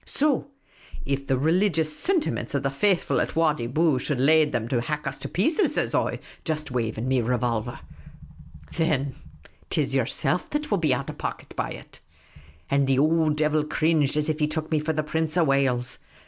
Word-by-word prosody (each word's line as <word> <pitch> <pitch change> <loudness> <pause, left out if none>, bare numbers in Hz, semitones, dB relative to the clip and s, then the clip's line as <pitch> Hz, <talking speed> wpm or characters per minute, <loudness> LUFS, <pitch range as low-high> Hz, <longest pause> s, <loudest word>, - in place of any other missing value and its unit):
So 290 -2 +2 0.6
if 140 0 -2
the 135 - +2
religious 160 +1 +2
sintiments 350 - -1
of 140 - 0
the 135 - 0
faithful 185 +6 +1
at - - -3
Wadi 150 -7 +1
Bou 155 +1 +2
should 135 0 -2
lade 155 +2 +4
them 120 -4 -2
to 125 -2 +1
hack 150 +4 -3
us - - -4
to - - -5
pieces,' 310 - +1
says - - 0
I, - - +1 0.3
just 155 -3 -3
waving 115 -1 -2
nie 130 -1 +2
revolver, 120 -1 -1 0.5
' 80 0 -19
thin 150 -5 0
EMPHASIS. 150 - -22 0.5
't - - +1
is - - -2
yerself - - 0
that 300 -2 -3
will 200 - +2
be 155 -4 +1
out 125 - -1
of - - -15
pocket - - -5
by - - -2
it,' - - -10 0.7
And 140 0 +2
the 135 -1 +2
ould 155 +1 +3
diwil 150 0 +1
cringed 155 -2 +2
as 150 0 +1
if 155 0 -1
he 150 - +2
took 155 +1 -4
nie 155 - +2
for 150 +2 -1
the 155 0 -1
Prince 160 +2 -1
of 170 - +4
Wales. 135 -3 +1
150 Hz, 200 wpm, -25 LUFS, 130-160 Hz, 0.7 s, lade